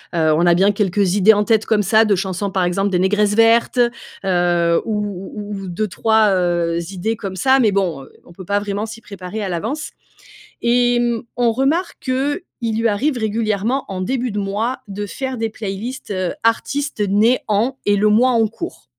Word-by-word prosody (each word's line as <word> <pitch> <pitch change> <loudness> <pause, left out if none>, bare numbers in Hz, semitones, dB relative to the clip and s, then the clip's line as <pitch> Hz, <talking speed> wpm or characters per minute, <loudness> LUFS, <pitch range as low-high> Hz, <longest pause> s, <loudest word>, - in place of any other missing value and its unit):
heu, 160 -1 +3
on 170 +2 +2
a 170 - +5
bien 195 +3 +4
quelques 195 -2 +1
idées 205 +2 +6
en 210 0 +1
tête, 220 0 +1
comme 215 -2 +2
ça, 220 +3 +4
de 205 -2 +3
chansons. 190 +1 -2
Par 185 -1 0
exemple, 195 +3 0
des 185 - 0
Négresses 205 +2 +2
Vertes, 230 +2 +3 0.5
heu, 175 -2 +2
ou 210 -2 -1 0.3
ou 205 -1 -6
ou - - -7
2-3, 215 +3 +1
heu, 175 -2 0
idées 215 +5 -2
comme 190 -2 -6
ça, 265 +7 +3
mais 220 -5 +3
bon, 175 -8 -1 0.2
on 175 - -16
peut 185 +1 -11
pas 205 +1 +1
vraiment 205 +1 -3
s'y 225 +1 -9
préparer 200 0 -7
à - - -2
l'avance. 275 - -3 0.7
Et 240 0 +2
mmh, 235 -2 0 0.2
on 235 -2 +3
remarque 295 +9 0
qu'il 260 - -2
lui 230 0 +2
arrive 260 +7 0
régulièrement, 220 +3 -1
en 185 -1 -4
début 250 +3 -1
de 205 - -4
mois, 205 +5 -2
de 205 0 -5
faire 260 +3 -5
des 225 0 -1
playlists, 220 +4 -6
heu, 185 -2 -2
artistes 275 +3 -1
nés 220 +6 +3
en, 235 +6 0
et 205 0 +3
le 210 +1 +3
mois 250 +4 +4
en 225 -1 +3
cours. 340 - -8
210 Hz, 195 wpm, -19 LUFS, 190-235 Hz, 0.7 s, idées